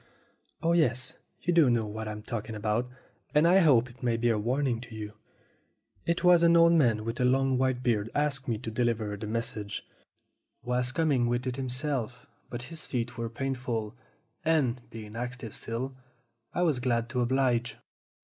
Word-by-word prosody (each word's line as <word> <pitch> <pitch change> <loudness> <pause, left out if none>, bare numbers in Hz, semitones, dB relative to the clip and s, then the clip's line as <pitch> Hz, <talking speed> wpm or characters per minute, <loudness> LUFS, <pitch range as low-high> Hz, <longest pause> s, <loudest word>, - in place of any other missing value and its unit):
"Oh, 165 - +3
yes, 125 -7 +1 0.3
you 175 - +1
do 165 -6 +6
know 120 -2 +2
what 110 +1 -5
I'm 105 0 -6
talking 110 0 -4
about, 110 +4 -1 0.5
and 150 +3 +6
I 185 +3 +6
hope 130 -9 +5
it 125 0 -17
may 120 -2 +1
be 120 +1 +2
a 110 - +1
warning 125 +1 0
to 115 -2 -10
you. 105 -1 -6 0.9
It 170 +1 0
was 180 -1 +6
an 170 0 +6
old 170 0 +6
man 115 -9 +3
with 115 +1 -3
a - - +2
long 130 +1 +3
white 130 -1 +1
beard 115 -3 +1
asked 145 -2 0
me 115 -3 0
to 110 - -6
deliver 110 -3 0
the 105 +1 -6
mes 115 +2 -1
sage. 105 -1 -5 0.8
Was 125 0 +1
coming 140 -6 +2
with 120 +1 -1
it 130 -1 -2
himself 130 -2 -2 0.2
but 120 0 -5
his 160 +4 -6
feet 120 -3 -2
were 115 0 -3
painful, 120 -3 -3 0.5
and, 140 -6 +2
being 110 -1 -9
active 120 -2 -5
still, 130 +4 -4 0.6
I 180 - 0
was 155 -7 +2
glad 120 -2 0
to 125 +1 -1
oblige. 120 -1 +1
125 Hz, 180 wpm, -29 LUFS, 115-135 Hz, 0.9 s, do